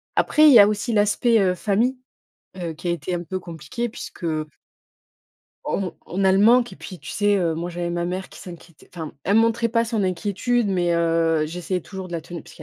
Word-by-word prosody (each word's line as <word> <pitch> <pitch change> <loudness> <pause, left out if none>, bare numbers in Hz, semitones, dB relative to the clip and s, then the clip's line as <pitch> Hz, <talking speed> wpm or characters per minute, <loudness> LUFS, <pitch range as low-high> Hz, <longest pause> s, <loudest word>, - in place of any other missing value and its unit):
Après, 305 0 +4
il 290 - +8
y 230 - +9
a 205 - +8
aussi 215 +3 -2
l'aspect, 215 +2 +3
heu, 185 -2 +2
famille 220 +8 0 0.8
qui 175 - -4
a - - +2
été 170 +2 -3
un 175 - -3
peu 185 +2 -4
compliqué 175 - -5
puisque 200 - -9 1.4
on 190 -3 -2
on 195 +3 -2
a 190 - +5
le 190 - +3
manque, 235 +3 +4
et - - -11
puis, 185 -3 -10
tu - - -9
sais, 205 0 +2
heu, 170 -4 0
moi, 170 +2 -4
j'avais 175 0 -4
ma 175 0 -2
mère 185 +2 -4
qui - - -13
s'inquiétait 170 -3 -13
enfin, 160 -3 -6
elle 200 +4 +2
montrait 230 +1 +2
pas 230 0 +1
son 225 -2 -1
inquiétude, 205 +5 0
mais 175 -2 +1
heu, 165 -1 +2
j'essayais 175 +2 -4
toujours 190 -2 -8
de 175 - -10
la 165 - -2
tenir 170 0 -8
puisqu'il 155 - -14
185 Hz, 215 wpm, -22 LUFS, 170-215 Hz, 1.4 s, y